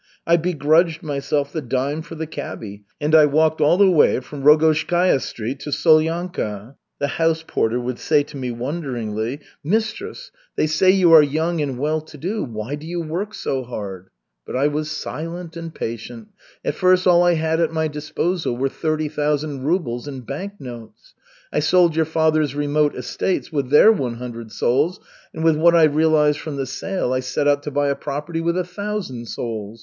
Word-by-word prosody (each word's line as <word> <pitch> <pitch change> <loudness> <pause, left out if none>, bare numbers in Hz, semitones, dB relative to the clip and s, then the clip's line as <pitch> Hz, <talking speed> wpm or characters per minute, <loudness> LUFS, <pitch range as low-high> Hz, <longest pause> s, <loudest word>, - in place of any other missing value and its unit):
I 170 - +4
begrudged 165 0 +2
myself 145 -1 -2
the 160 - -2
dime 135 +4 -2
for 165 +1 -10
the 160 0 -4
cabby, 105 -9 -7
and 150 +1 -1
I 155 -2 +7
walked 155 +2 +2
all 155 +4 +4
the 195 -1 +5
way 160 -6 +4
from 140 +2 -9
Rogozhskaya 155 +2 +4
Street 120 +4 -5
to 150 - -7
Solyanka. 155 - +1 0.2
The 145 - -1
house 165 +2 0
porter 115 -3 0
would 125 0 -4
say 150 -2 +2
to 145 - -13
me 130 -2 -4
wonderingly: 120 -2 -4 0.2
"Mistress, 225 - -2 0.2
they - - +2
say 155 +4 +2
you 185 -3 +5
are 160 - +10
young 160 +3 0
and 135 -4 -2
well 155 +4 0
to 155 -1 -14
do, 195 +9 -3
why 110 +2 -5
do 150 +2 -6
you 175 +1 -3
work 175 +6 -4
so 135 - -2
hard?" 100 -6 -7 0.3
But - - -7
I 135 +3 +2
was 150 +1 -3
silent 165 +2 -6
and 165 -1 -6
patient. 160 - -6 0.4
At - - 0
first 185 -1 +3
all 175 -1 +6
I 175 -1 +4
had 160 0 0
at 165 -1 +1
my 160 -1 0
disposal 155 -1 -2
were 135 +2 0
thirty 155 +1 -2
thousand 150 -2 -2
rubles 145 -7 -1
in 135 -3 -6
bank 165 - -6
notes. 120 -3 -11 0.4
I - - +2
sold 170 +1 +3
your 160 0 +2
father's 155 -3 +1
remote 145 0 +1
estates 185 - -2
with 140 -5 -2
their 150 +10 +7
one 130 - -1
hundred 115 -2 -8
souls, 145 +12 +1 0.3
and 160 - -5
with 160 -2 +4
what 170 +2 +5
I 165 - +6
realized 155 -1 +3
from 155 -3 -6
the 135 -1 -2
sale 130 +1 -2
I 130 - +1
set 130 +3 -1
out 145 0 +3
to 145 - -5
buy 145 0 +1
a 140 - +1
property 150 +4 -4
with 170 +1 0
a 185 - +1
thousand 180 - -5
souls. 110 -1 -5
150 Hz, 190 wpm, -21 LUFS, 135-165 Hz, 0.4 s, are